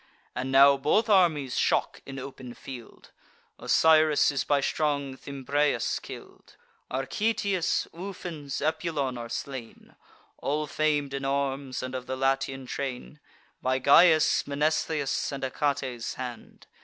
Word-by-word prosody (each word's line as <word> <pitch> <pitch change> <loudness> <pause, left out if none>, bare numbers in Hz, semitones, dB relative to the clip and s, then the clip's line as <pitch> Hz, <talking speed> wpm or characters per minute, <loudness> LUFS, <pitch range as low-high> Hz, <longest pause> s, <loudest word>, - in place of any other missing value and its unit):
And 130 +1 -3
now 140 +1 +7
both 180 +12 +2
armies 160 -9 +3
shock - - +1
in 135 0 -7
open 130 -2 -8
field; 125 -4 -11 0.5
Osiris 155 -2 +4
is 140 -2 -1
by 145 -1 +2
strong 140 -2 -1
Thymbraeus 140 -1 -1
kill'd. - - -12 0.3
Archetius, 190 - 0
Ufens, 165 -6 -6
Epulon, 155 -4 -1
are 115 0 -7
slain 130 -4 -7 0.4
(All 150 +2 -1
fam'd 145 -2 0
in 135 0 -3
arms, 135 -1 -2
and 130 0 -5
of 130 -1 -5
the 130 - -3
Latian 135 0 0
train) 135 +3 -5 0.4
By 130 0 +1
Gyas', 155 +4 +5
Mnestheus', 150 0 0
and 140 -1 -5
Achates' 130 -3 -2
hand. 125 -2 -8
140 Hz, 120 wpm, -27 LUFS, 130-155 Hz, 0.5 s, now